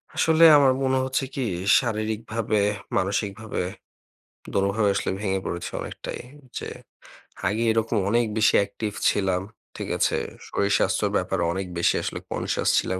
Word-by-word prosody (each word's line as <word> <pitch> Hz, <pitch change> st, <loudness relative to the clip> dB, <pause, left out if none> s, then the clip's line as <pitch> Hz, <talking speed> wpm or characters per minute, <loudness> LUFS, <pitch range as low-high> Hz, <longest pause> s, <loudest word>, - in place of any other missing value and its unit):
আসলে 160 Hz, 0 st, +4 dB
আমার 135 Hz, -2 st, +5 dB
মনে 130 Hz, 0 st, +2 dB
হচ্ছে 130 Hz, +1 st, -1 dB
কি 135 Hz, -, -1 dB, 0.4 s
শারীরিকভাবে, 110 Hz, -1 st, -2 dB, 0.4 s
মানসিকভাবে 100 Hz, +2 st, -2 dB, 0.9 s
দোনোভাবে 100 Hz, +2 st, +2 dB
আসলে 100 Hz, -, -1 dB
ভেঙে 95 Hz, -2 st, -1 dB
পড়েছে 85 Hz, -, -4 dB
অনেকটাই। -, -, -6 dB, 0.4 s
যে -, -, -6 dB, 0.8 s
আগে 105 Hz, +4 st, 0 dB
এইরকম 115 Hz, 0 st, +1 dB
অনেক 120 Hz, +2 st, +3 dB
বেশি 110 Hz, -, +4 dB
অ্যাকটিভ 100 Hz, +1 st, -2 dB, 0.2 s
ছিলাম, 95 Hz, -2 st, 0 dB, 0.3 s
ঠিক -, -, -5 dB
আছে? -, -, +2 dB, 0.3 s
শরীর-স্বাস্থ্যর 100 Hz, 0 st, +1 dB
ব্যাপারে -, -, -1 dB
অনেক 95 Hz, 0 st, -3 dB
বেশি 85 Hz, -, +3 dB
আসলে -, -, -3 dB
conscious -, -, -1 dB
ছিলাম। 95 Hz, -, -2 dB
105 Hz, 130 wpm, -25 LUFS, 100-115 Hz, 0.9 s, আমার